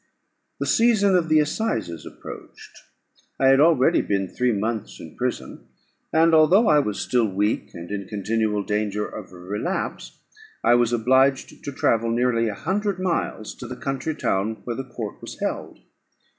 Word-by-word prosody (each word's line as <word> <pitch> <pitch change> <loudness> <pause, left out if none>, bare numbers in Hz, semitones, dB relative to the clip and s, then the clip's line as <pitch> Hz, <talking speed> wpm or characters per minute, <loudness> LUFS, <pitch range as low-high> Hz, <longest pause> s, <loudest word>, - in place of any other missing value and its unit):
The - - -1
season 215 -4 +3
of 170 -3 +1
the 155 0 +5
assizes 115 - -2
approached. - - -11 0.6
I 135 - +5
had 135 0 +5
already 150 -4 +4
been 95 -1 -1
three 125 +6 0
months 110 +1 -3
in - - -11
prison; - - -4 0.4
and 165 +1 +4
although 170 +8 +5
I 150 - +5
was 105 -8 -2
still 120 -3 +1
weak, 105 +2 -1
and 85 +2 -8
in 100 -2 -4
continual 105 0 -1
danger 105 0 -1
of 100 -4 -9
a 90 - -12
relapse, 105 - -4 0.5
I - - +5
was 120 -1 +3
obliged 130 +3 +2
to 140 - -4
travel 115 -3 +1
nearly 115 -1 +1
a 105 - -3
hundred 195 - -2
miles 170 - -2
to 125 - -9
the 125 +1 -7
county 135 +3 -3
town, 110 -4 -1
where 120 - -4
the 135 - -5
court 110 -5 -6
was - - -9
held. - - -4
120 Hz, 165 wpm, -23 LUFS, 105-155 Hz, 0.6 s, the